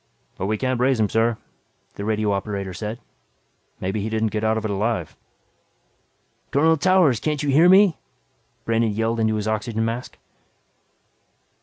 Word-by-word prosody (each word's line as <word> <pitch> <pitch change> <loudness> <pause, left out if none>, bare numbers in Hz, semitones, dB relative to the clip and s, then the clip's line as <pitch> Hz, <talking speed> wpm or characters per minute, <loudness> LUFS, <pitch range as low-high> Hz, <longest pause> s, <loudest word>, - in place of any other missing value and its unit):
"But 95 - -3
we 110 +1 0
can't 130 0 -1
raise 130 -1 +2
him 105 -2 +2
sir," 115 +1 +1 0.6
the 100 - -7
radio 105 0 0
operator 100 -1 -3
said. 105 +6 -5 0.8
"Maybe 95 +3 -2
he 110 - -3
didn't 110 -1 -1
get 110 0 -3
out 110 0 +1
of 110 - -4
it 105 - -1
alive." 100 -5 -2 1.3
"Colonel 160 +3 +3
Towers, 175 - +3
can't 150 +2 -2
you 145 - -1
hear 160 +6 +5
me?" 190 -2 +5 0.7
Brandon 115 0 +1
yelled 115 +2 -1
into 110 -1 +1
his 105 0 -3
oxygen 110 +1 -1
mask. 115 +2 -5
110 Hz, 155 wpm, -22 LUFS, 105-130 Hz, 1.3 s, hear